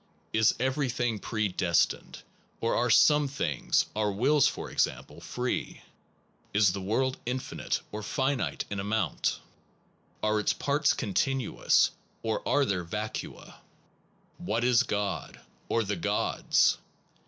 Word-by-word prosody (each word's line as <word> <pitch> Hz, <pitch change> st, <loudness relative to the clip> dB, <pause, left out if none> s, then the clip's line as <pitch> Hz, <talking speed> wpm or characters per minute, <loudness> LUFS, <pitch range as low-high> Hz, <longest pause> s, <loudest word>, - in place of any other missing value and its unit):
Is 110 Hz, -1 st, +4 dB
everything 125 Hz, -4 st, 0 dB
predestined, 95 Hz, -6 st, 0 dB, 0.4 s
or 115 Hz, -, 0 dB
are 120 Hz, +1 st, +1 dB
some 150 Hz, +5 st, +5 dB
things 135 Hz, -, 0 dB
(our 105 Hz, -1 st, +1 dB
wills 135 Hz, +8 st, +3 dB
for -, -, -4 dB
example) -, -, -1 dB
free? 125 Hz, 0 st, -3 dB, 0.7 s
Is 105 Hz, -3 st, +5 dB
the 100 Hz, -, -4 dB
world 130 Hz, +7 st, 0 dB
infinite 130 Hz, +1 st, -2 dB
or 105 Hz, -, -5 dB
finite 130 Hz, +5 st, -1 dB
in 100 Hz, -, -2 dB
amount? 105 Hz, +3 st, -1 dB, 0.8 s
Are 110 Hz, 0 st, +2 dB
its 105 Hz, -, +1 dB
parts 145 Hz, +1 st, +1 dB
continuous, 130 Hz, +3 st, +1 dB, 0.3 s
or 110 Hz, -1 st, -1 dB
are 145 Hz, -1 st, +3 dB
there 95 Hz, -6 st, -1 dB
vacua? 105 Hz, +5 st, -6 dB, 0.8 s
What 115 Hz, +3 st, -1 dB
is 125 Hz, 0 st, +5 dB
God? 105 Hz, -6 st, -3 dB, 0.3 s
or 115 Hz, -, +2 dB
the 105 Hz, 0 st, -2 dB
gods? 85 Hz, -, +2 dB
110 Hz, 120 wpm, -29 LUFS, 105-130 Hz, 0.8 s, some